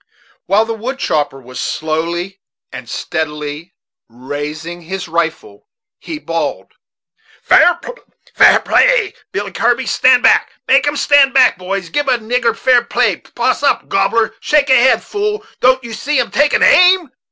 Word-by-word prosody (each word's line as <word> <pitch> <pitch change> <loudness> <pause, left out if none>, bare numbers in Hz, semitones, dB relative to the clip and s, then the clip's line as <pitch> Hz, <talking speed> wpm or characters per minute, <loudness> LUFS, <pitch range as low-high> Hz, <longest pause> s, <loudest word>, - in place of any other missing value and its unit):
While 210 +3 +2
the 225 - -4
wood 245 +5 -5
chopper 145 - -2
was 125 -1 -11
slowly 170 +5 -4 0.3
and 125 -2 -9
steadily 150 +1 -5 0.3
raising 150 +7 -7
his 190 +2 -6
rifle, 160 -11 -4 0.3
he 320 - -7
bawled; 165 - -4 0.7
"Fair 355 - +4 0.8
play, - - +2 0.2
Billy - - -4
Kirby - - 0
stand - - +3
back - - +3
make 270 +2 +3
'em 290 0 -1
stand 275 -2 +3
back, 255 -8 +4
boys 185 -1 -5
gib 290 +4 -2
a 250 - +2
nigger 230 0 -1
fair 250 -2 +3
play 235 - 0
poss - - -3
up, - - 0
gobbler; 230 -1 0
shake 285 -3 +1
a - - +6
head, 260 +1 +3
fool; 420 0 -4
don't 260 +1 +2
you 235 -1 -8
see 290 +4 -1
'em 245 - -2
taking 290 +1 +2
aim?" 360 -5 +4
225 Hz, 145 wpm, -15 LUFS, -, 0.8 s, a